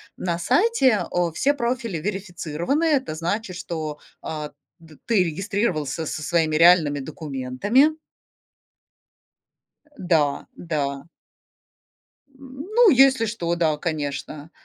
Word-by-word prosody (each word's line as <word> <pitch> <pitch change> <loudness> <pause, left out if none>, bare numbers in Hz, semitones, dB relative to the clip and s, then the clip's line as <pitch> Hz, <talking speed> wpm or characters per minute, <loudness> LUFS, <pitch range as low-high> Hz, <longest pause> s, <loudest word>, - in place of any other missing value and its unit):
На 170 -1 -3
сайте 265 - +3
о 175 -2 0
все 285 - +2
профили 235 -7 -2
верифицированы. 180 - -2
Это 270 - +1
значит, 185 +3 -3
что, 155 -4 -5 0.2
э, 150 -1 -5 0.3
д 160 -2 -17
ты 210 -6 +3
регистрировался 170 - -2
со 155 - -5
своими 160 0 +1
реальными 165 -3 +5
документами. 150 - 0 2.0
Э, - - -29
да, 160 -6 +1
да. 140 -4 -3 1.2
М, 270 +1 -11
ну, 475 -4 +7
если 265 -3 +5
что, 175 -6 -2
да, 160 -3 +1
конечно, 150 -1 -5
175 Hz, 105 wpm, -23 LUFS, 155-235 Hz, 2.0 s, ну